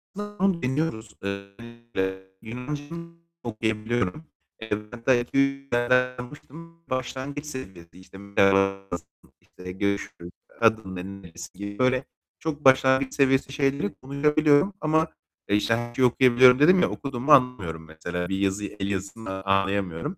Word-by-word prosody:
Aslında 205 Hz, -1 st, -5 dB
onu 190 Hz, -4 st, +2 dB
deniyoruz, 125 Hz, -5 st, -2 dB
eee, 100 Hz, -, -1 dB, 0.3 s
özellikle 115 Hz, -5 st, -5 dB
Yunanca 125 Hz, +6 st, -5 dB, 0.6 s
okuyabiliyorum. 110 Hz, -, -2 dB, 0.3 s
Evet, 110 Hz, +2 st, -6 dB
belki 120 Hz, -2 st, +2 dB
1-2 140 Hz, 0 st, +1 dB
kelime 120 Hz, -1 st, +1 dB
öğrenmiştim. 125 Hz, +6 st, -2 dB
Başlangıç 130 Hz, +3 st, -4 dB
seviyesi, 95 Hz, -, -9 dB
işte 95 Hz, +1 st, -14 dB
"Merhaba", 95 Hz, 0 st, +2 dB
"Nasılsın?", 85 Hz, -2 st, -9 dB
işte, 90 Hz, 0 st, -10 dB
"Görüşürüz.", 100 Hz, -2 st, -3 dB, 0.3 s
"Adın 110 Hz, -4 st, +2 dB
ne?", 90 Hz, 0 st, -5 dB, 0.2 s
"Nerelisin?" 90 Hz, +1 st, -11 dB
gibi 100 Hz, +4 st, -3 dB
öyle 130 Hz, +1 st, +2 dB, 0.3 s
çok 150 Hz, -2 st, -4 dB
başlangıç 130 Hz, 0 st, +5 dB
seviyesi 135 Hz, -1 st, +2 dB
şeyleri 135 Hz, -7 st, 0 dB
konuşabiliyorum 150 Hz, +5 st, +2 dB
ama, 155 Hz, +1 st, +2 dB, 0.4 s
eee, 100 Hz, -, +3 dB
işte, 105 Hz, +2 st, +2 dB
anca 120 Hz, +2 st, 0 dB
okuyabiliyorum 125 Hz, 0 st, +6 dB
dedim 180 Hz, +5 st, +6 dB
ya, -, -, +3 dB
okuduğumu 135 Hz, 0 st, -3 dB
anlamıyorum 105 Hz, -, +3 dB
mesela. 85 Hz, +3 st, -5 dB
Bir 95 Hz, -, -1 dB
yazıyı, 100 Hz, +1 st, -1 dB
el 100 Hz, 0 st, -2 dB
yazısını 95 Hz, 0 st, -5 dB
anlayamıyorum. 95 Hz, -, 0 dB
120 Hz, 130 wpm, -25 LUFS, 100-135 Hz, 0.6 s, okuyabiliyorum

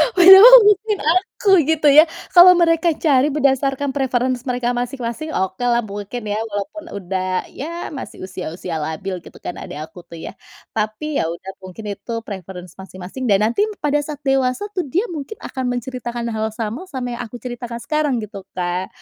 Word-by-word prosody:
Padahal 385 Hz, +6 st, +10 dB
mungkin 420 Hz, 0 st, +2 dB
aku 385 Hz, +4 st, -1 dB, 0.2 s
gitu 315 Hz, -1 st, +1 dB
ya, 305 Hz, +4 st, +8 dB, 0.3 s
kalau 360 Hz, +1 st, +9 dB
mereka 335 Hz, -1 st, +2 dB
cari 275 Hz, -3 st, +4 dB
berdasarkan 275 Hz, -1 st, +1 dB
preference 255 Hz, -1 st, -1 dB
mereka 245 Hz, -1 st, -1 dB
masing-masing 245 Hz, +4 st, -4 dB
okelah 235 Hz, +6 st, 0 dB
mungkin 205 Hz, +3 st, -6 dB
ya 210 Hz, -, -1 dB
walaupun 295 Hz, +11 st, -5 dB, 0.2 s
udah 185 Hz, 0 st, -3 dB
ya 335 Hz, +5 st, -6 dB
masih -, -, -9 dB
usia-usia 180 Hz, -2 st, -6 dB
labil 160 Hz, +5 st, -4 dB
gitu -, -, -14 dB
kan, -, -, -5 dB
adik -, -, -8 dB
aku 205 Hz, -, -15 dB
tuh 170 Hz, -, -13 dB
ya. -, -, -6 dB, 0.4 s
Tapi 220 Hz, +8 st, -2 dB
ya -, -, 0 dB
udah 190 Hz, +2 st, -9 dB
mungkin 185 Hz, +4 st, -10 dB
itu -, -, -12 dB, 0.2 s
preference 185 Hz, -3 st, -8 dB
masing-masing 190 Hz, +7 st, -7 dB
dan 200 Hz, -4 st, +4 dB
nanti 410 Hz, -, +1 dB, 0.2 s
pada 295 Hz, 0 st, +1 dB
saat 295 Hz, -1 st, -7 dB
dewasa 270 Hz, +3 st, +1 dB
tuh 360 Hz, -5 st, -2 dB
dia 360 Hz, -, 0 dB
mungkin 315 Hz, +5 st, -6 dB
akan 260 Hz, -1 st, -5 dB
menceritakan 240 Hz, -1 st, -4 dB
hal 220 Hz, 0 st, -2 dB
yang 220 Hz, -, -7 dB
sama, 225 Hz, +8 st, -4 dB
sama 260 Hz, -7 st, -5 dB
yang -, -, -4 dB
aku 225 Hz, -, -16 dB
ceritakan 240 Hz, -1 st, -6 dB
sekarang 300 Hz, -3 st, 0 dB
gitu 200 Hz, -2 st, -9 dB
Kak. 180 Hz, +1 st, -2 dB
245 Hz, 170 wpm, -19 LUFS, 200-300 Hz, 0.4 s, Padahal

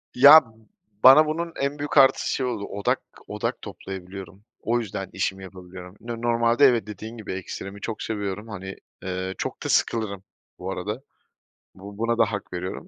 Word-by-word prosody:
Ya, 145 Hz, +4 st, +10 dB, 0.6 s
bana 135 Hz, +4 st, +9 dB
bunun 165 Hz, +2 st, -3 dB
en 140 Hz, +1 st, -2 dB
büyük 145 Hz, 0 st, -3 dB
artısı 135 Hz, -1 st, +5 dB
şey 130 Hz, -, -1 dB
oldu, 105 Hz, -5 st, -3 dB
odak 100 Hz, -1 st, -1 dB, 0.3 s
odak -, -, -3 dB
toplayabiliyorum. 95 Hz, 0 st, -9 dB, 0.2 s
O 120 Hz, +1 st, +1 dB
yüzden 95 Hz, -4 st, -5 dB
işimi 95 Hz, 0 st, -2 dB
yapabiliyorum. 90 Hz, 0 st, -11 dB
No 115 Hz, 0 st, -6 dB
normalde 120 Hz, +3 st, +3 dB
evet 120 Hz, -6 st, +3 dB
dediğin 110 Hz, +3 st, -8 dB
gibi, 105 Hz, -3 st, -6 dB
ekstremi 95 Hz, +2 st, -7 dB
çok 110 Hz, -3 st, -5 dB
seviyorum, 105 Hz, 0 st, -4 dB
hani, 95 Hz, -2 st, -7 dB, 0.3 s
eee, 95 Hz, 0 st, -3 dB
çok -, -, -5 dB
da -, -, -3 dB
sıkılırım 100 Hz, -4 st, 0 dB, 0.4 s
bu 95 Hz, +2 st, -4 dB
arada. 105 Hz, +7 st, -4 dB, 0.7 s
Bu 100 Hz, +1 st, -11 dB
buna 115 Hz, +1 st, 0 dB
da 115 Hz, -, +5 dB
hak 100 Hz, -3 st, -6 dB
veriyorum 90 Hz, +1 st, -5 dB
105 Hz, 165 wpm, -24 LUFS, 95-120 Hz, 0.7 s, Ya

